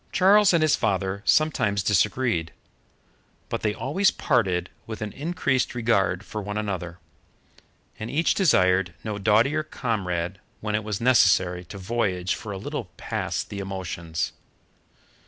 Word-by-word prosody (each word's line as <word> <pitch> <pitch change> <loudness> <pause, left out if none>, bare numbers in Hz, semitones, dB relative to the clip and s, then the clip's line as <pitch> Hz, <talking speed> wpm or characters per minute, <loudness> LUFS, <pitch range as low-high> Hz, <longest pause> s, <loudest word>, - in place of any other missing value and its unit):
Charles 200 +2 +5
and 170 -3 +3
his 155 - +4
father 95 -2 -1
sometimes 105 -11 +2
disagreed. 105 -4 +1 1.0
But - - -3
they 105 -1 0
always 180 - +2
parted 95 - 0 0.2
with 110 -1 -6
an 105 - -4
increased 140 -5 -1
regard 100 -5 +1
for 105 - -5
one 105 +1 -4
another, 90 -5 -3 1.0
and 110 - -5
each 160 +3 +2
desired 95 - +3
no 105 -2 -4
doughtier 115 +9 +3
comrade 95 - -3 0.2
when 105 -1 -3
it 105 +1 0
was 105 -1 -4
necessary 95 -7 +4
to 95 +4 -9
voyage 95 -3 -1
for 105 - -6
a 100 - -4
little 140 +4 -4
past - - -3
the 100 - -5
emotions. 90 -4 -4
105 Hz, 135 wpm, -25 LUFS, 95-125 Hz, 1.0 s, Charles